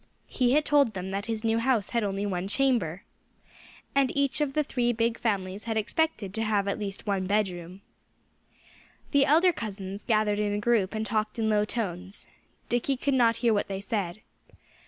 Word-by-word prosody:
He 250 Hz, -1 st, +2 dB
had 300 Hz, +1 st, +3 dB
told 280 Hz, -7 st, +3 dB
them 185 Hz, +1 st, -4 dB
that 200 Hz, +2 st, -3 dB
his 225 Hz, -1 st, -3 dB
new 225 Hz, 0 st, +2 dB
house 230 Hz, -4 st, +1 dB
had 235 Hz, -2 st, +1 dB
only 200 Hz, 0 st, -2 dB
one 185 Hz, -2 st, -2 dB
chamber. 205 Hz, -, +1 dB, 0.9 s
And 275 Hz, -2 st, +3 dB
each 280 Hz, +1 st, +1 dB
of 285 Hz, -2 st, 0 dB
the 305 Hz, -, +2 dB
three 245 Hz, -4 st, 0 dB
big 230 Hz, 0 st, 0 dB
families 200 Hz, -2 st, -2 dB
had 225 Hz, -1 st, -1 dB
expected 215 Hz, -, -1 dB
to 220 Hz, -, -1 dB
have 210 Hz, -2 st, +1 dB
at 200 Hz, -, -1 dB
least 200 Hz, 0 st, -5 dB
one 195 Hz, -3 st, -1 dB
bedroom. 190 Hz, -2 st, -2 dB, 1.3 s
The 280 Hz, -2 st, +4 dB
elder 335 Hz, +5 st, +5 dB
cousins 200 Hz, -4 st, -6 dB
gathered 215 Hz, -3 st, +1 dB
in 205 Hz, -1 st, 0 dB
a 205 Hz, -, -1 dB
group 215 Hz, -2 st, +1 dB
and 220 Hz, 0 st, -2 dB
talked 215 Hz, 0 st, -1 dB
in 220 Hz, -1 st, +1 dB
low 210 Hz, 0 st, +3 dB
tones. 195 Hz, -4 st, -4 dB, 0.4 s
Dickie 245 Hz, +3 st, 0 dB
could 280 Hz, +2 st, 0 dB
not 235 Hz, -3 st, +4 dB
hear 230 Hz, -, +5 dB
what 205 Hz, -, 0 dB
they 195 Hz, -1 st, -4 dB
said. 200 Hz, -2 st, -3 dB
215 Hz, 185 wpm, -27 LUFS, 200-240 Hz, 1.3 s, elder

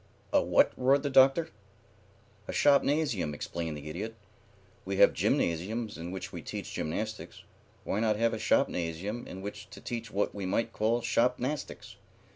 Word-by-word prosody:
"A -, -, +5 dB
what?" -, -, +4 dB
roared 135 Hz, +3 st, +3 dB
the 145 Hz, -, -1 dB
Doctor. 135 Hz, +5 st, +5 dB, 1.0 s
"A -, -, -3 dB
shopnasium," 140 Hz, -, +2 dB
explained 80 Hz, 0 st, -4 dB
the 75 Hz, +1 st, -9 dB
Idiot. 105 Hz, +9 st, -5 dB, 0.7 s
"We 95 Hz, +1 st, -3 dB
have -, -, +6 dB
gymnasiums 105 Hz, +7 st, 0 dB
in 85 Hz, +1 st, -6 dB
which 95 Hz, +1 st, -6 dB
we -, -, -5 dB
teach -, -, -6 dB
gymnastics. 110 Hz, +8 st, -4 dB, 0.4 s
Why 100 Hz, -, -1 dB
not 110 Hz, -1 st, +2 dB
have 115 Hz, +2 st, +1 dB
a -, -, -3 dB
shopnasium 90 Hz, +7 st, 0 dB
in 95 Hz, +1 st, -8 dB
which 105 Hz, 0 st, -7 dB
to 100 Hz, -, -11 dB
teach 115 Hz, -2 st, -5 dB
what 105 Hz, 0 st, -1 dB
we 100 Hz, -2 st, -4 dB
might 115 Hz, +4 st, 0 dB
call 115 Hz, +3 st, +1 dB
shopnastics? 125 Hz, +4 st, -1 dB
110 Hz, 155 wpm, -30 LUFS, 95-125 Hz, 1.0 s, have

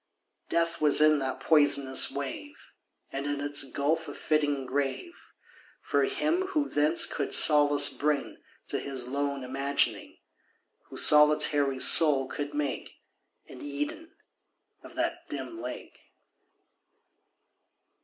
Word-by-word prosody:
Death 170 Hz, -1 st, -2 dB
was 150 Hz, -2 st, +5 dB
in 155 Hz, -1 st, +2 dB
that 130 Hz, -1 st, -6 dB
poisonous 140 Hz, -4 st, +3 dB
wave, 140 Hz, -, -8 dB, 0.6 s
And 140 Hz, +1 st, -6 dB
in 145 Hz, -1 st, -4 dB
its 145 Hz, 0 st, +2 dB
gulf 150 Hz, +4 st, -4 dB
a 145 Hz, -, -10 dB
fitting 145 Hz, -3 st, -3 dB
grave 140 Hz, -, -5 dB, 0.7 s
For -, -, -1 dB
him 375 Hz, -2 st, -3 dB
who 295 Hz, -2 st, -1 dB
thence 150 Hz, +3 st, 0 dB
could -, -, -1 dB
solace 145 Hz, -1 st, +6 dB
bring 150 Hz, -1 st, -4 dB, 0.3 s
To -, -, -3 dB
his 135 Hz, -3 st, -3 dB
lone 140 Hz, 0 st, -5 dB
imagining— 135 Hz, +2 st, -2 dB, 0.7 s
Whose -, -, +1 dB
solitary 150 Hz, -2 st, +3 dB
soul 140 Hz, -3 st, +6 dB
could 145 Hz, +1 st, -8 dB
make 145 Hz, -3 st, -6 dB, 0.5 s
An 125 Hz, -, -14 dB
Eden 145 Hz, -, -8 dB, 0.7 s
of -, -, -16 dB
that -, -, -5 dB
dim 340 Hz, 0 st, -8 dB
lake. -, -, -10 dB
145 Hz, 115 wpm, -26 LUFS, 140-155 Hz, 0.7 s, solace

